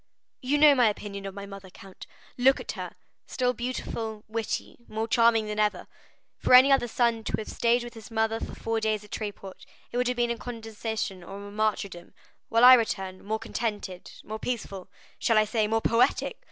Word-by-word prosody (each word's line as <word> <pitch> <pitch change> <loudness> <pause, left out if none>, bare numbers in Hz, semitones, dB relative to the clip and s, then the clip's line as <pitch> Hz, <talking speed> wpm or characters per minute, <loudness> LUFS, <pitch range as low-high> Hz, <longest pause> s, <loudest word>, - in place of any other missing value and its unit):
"You 275 +3 +1
know 295 -1 +7
my 245 -5 +4
opinion 200 -1 -6
of 195 - -8
my 200 0 -7
mother, 195 -1 -10
count; 190 +1 -13 0.3
look 265 +2 +4
at - - -5
her,—still 250 -1 -4
beautiful, 225 -3 -4
witty, 225 +1 -4
more 220 +1 -3
charming 230 -1 +4
than 210 0 -4
ever. 210 -1 +1 0.5
For - - +5
any 260 +2 +8
other 270 -3 +4
son 235 -1 +1
to - - -4
have 220 - -6
stayed 240 +1 +1
with 240 - -9
his 225 -1 -11
mother 225 0 0
for - - -6
four 225 0 -2
days 215 -1 -1
at 210 - -16
Tréport, 200 -3 -6 0.3
it 240 - -3
would 250 0 +1
have 250 0 -1
been 240 -1 +1
a 235 - -3
condescension 220 -4 -5
or 200 +2 -9
a - - -10
martyrdom, 205 -4 -2 0.3
while 230 +2 +5
I 255 - +11
return, 195 -6 0
more 215 +2 -2
contented, 210 -5 -4
more 220 +1 -6
peaceful—shall 220 -1 -3
I 215 - +5
say 215 0 0
more 225 +1 +1
poetic! 230 +2 +1
220 Hz, 190 wpm, -27 LUFS, 205-240 Hz, 0.5 s, I